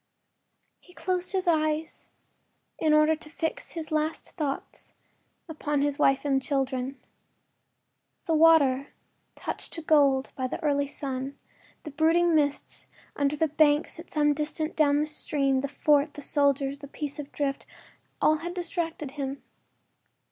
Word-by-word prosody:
He 360 Hz, -, -20 dB
closed 365 Hz, -1 st, -2 dB
his 375 Hz, -2 st, -1 dB
eyes 310 Hz, -1 st, 0 dB, 0.7 s
in 310 Hz, -, +2 dB
order 305 Hz, +1 st, +5 dB
to 305 Hz, 0 st, -9 dB
fix 325 Hz, +10 st, -4 dB
his 325 Hz, -1 st, -5 dB
last 310 Hz, +1 st, -1 dB
thoughts 290 Hz, -5 st, -5 dB, 0.5 s
upon 295 Hz, -3 st, -1 dB
his 290 Hz, 0 st, -1 dB
wife 270 Hz, 0 st, +3 dB
and 270 Hz, -2 st, +2 dB
children. 270 Hz, -1 st, -2 dB, 1.3 s
The 330 Hz, -, 0 dB
water, 300 Hz, -4 st, +5 dB, 0.5 s
touched -, -, -5 dB
to 330 Hz, -, -5 dB
gold 280 Hz, -4 st, +3 dB
by 260 Hz, -1 st, -2 dB
the 255 Hz, -, -5 dB
early 285 Hz, -1 st, +1 dB
sun, 270 Hz, -1 st, -4 dB, 0.5 s
the 305 Hz, -, -7 dB
brooding 330 Hz, +3 st, +3 dB
mists 290 Hz, -2 st, 0 dB, 0.3 s
under 285 Hz, 0 st, +1 dB
the 320 Hz, +1 st, +1 dB
banks 300 Hz, +2 st, +2 dB
at 335 Hz, -, -11 dB
some 295 Hz, -1 st, +2 dB
distance 310 Hz, +2 st, -2 dB
down 290 Hz, -2 st, +3 dB
the -, -, +1 dB
stream, 275 Hz, -3 st, 0 dB
the 280 Hz, -, -2 dB
fort, 290 Hz, +1 st, +2 dB
the 295 Hz, -, -7 dB
soldiers, 280 Hz, -1 st, +1 dB
the 285 Hz, -, -9 dB
piece 290 Hz, +1 st, -6 dB
of 290 Hz, -1 st, -7 dB
drift—all 285 Hz, +2 st, -2 dB
had 345 Hz, +3 st, -6 dB
distracted 330 Hz, -5 st, -3 dB
him. 275 Hz, -1 st, -5 dB
295 Hz, 140 wpm, -27 LUFS, 280-315 Hz, 1.3 s, order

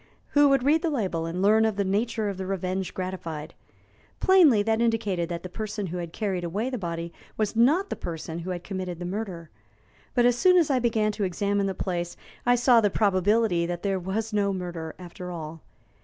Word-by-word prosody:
Who 290 Hz, -1 st, +5 dB
would 275 Hz, -2 st, +3 dB
read 305 Hz, +4 st, +3 dB
the 335 Hz, -, 0 dB
label 185 Hz, -, -1 dB
and 180 Hz, +3 st, -2 dB
learn 215 Hz, +2 st, +5 dB
of 220 Hz, -2 st, +1 dB
the 200 Hz, -, +1 dB
nature 215 Hz, +2 st, 0 dB
of 200 Hz, -2 st, -3 dB
the 190 Hz, -1 st, -4 dB
revenge 190 Hz, 0 st, -2 dB
gratified? 170 Hz, -5 st, -5 dB, 0.7 s
Plainly, 325 Hz, -, +6 dB
that 225 Hz, +1 st, +1 dB
indicated 210 Hz, -7 st, 0 dB
that 170 Hz, -1 st, -4 dB
the -, -, -4 dB
person 215 Hz, +1 st, -4 dB
who 180 Hz, 0 st, -4 dB
had 170 Hz, -2 st, -5 dB
carried 190 Hz, -3 st, -2 dB
away 205 Hz, +9 st, -2 dB
the 250 Hz, -, -3 dB
body 170 Hz, -2 st, -4 dB, 0.2 s
was 215 Hz, 0 st, -1 dB
not 305 Hz, -, +3 dB
the -, -, 0 dB
person 165 Hz, 0 st, -5 dB
who 175 Hz, +2 st, -6 dB
had 175 Hz, -1 st, -4 dB
committed 185 Hz, -3 st, -4 dB
the 175 Hz, -, -6 dB
murder. 180 Hz, -4 st, -5 dB, 0.6 s
But 245 Hz, -1 st, +4 dB
as 245 Hz, -1 st, +4 dB
soon 365 Hz, +8 st, +5 dB
as 325 Hz, -5 st, +3 dB
I 260 Hz, -, +3 dB
began 220 Hz, -3 st, +1 dB
to 210 Hz, 0 st, -3 dB
examine 200 Hz, +2 st, 0 dB
the 190 Hz, -, -2 dB
place 175 Hz, -2 st, -3 dB, 0.3 s
I 245 Hz, -, +6 dB
saw 245 Hz, -1 st, +5 dB
the 205 Hz, -, +3 dB
probability 200 Hz, -2 st, +2 dB
that 175 Hz, 0 st, -4 dB
there 195 Hz, -2 st, 0 dB
was 210 Hz, +5 st, -3 dB
no 200 Hz, -1 st, +2 dB
murder, 175 Hz, -4 st, -5 dB
after 180 Hz, 0 st, -8 dB
all. 165 Hz, -2 st, -7 dB
195 Hz, 210 wpm, -26 LUFS, 175-225 Hz, 0.7 s, Plainly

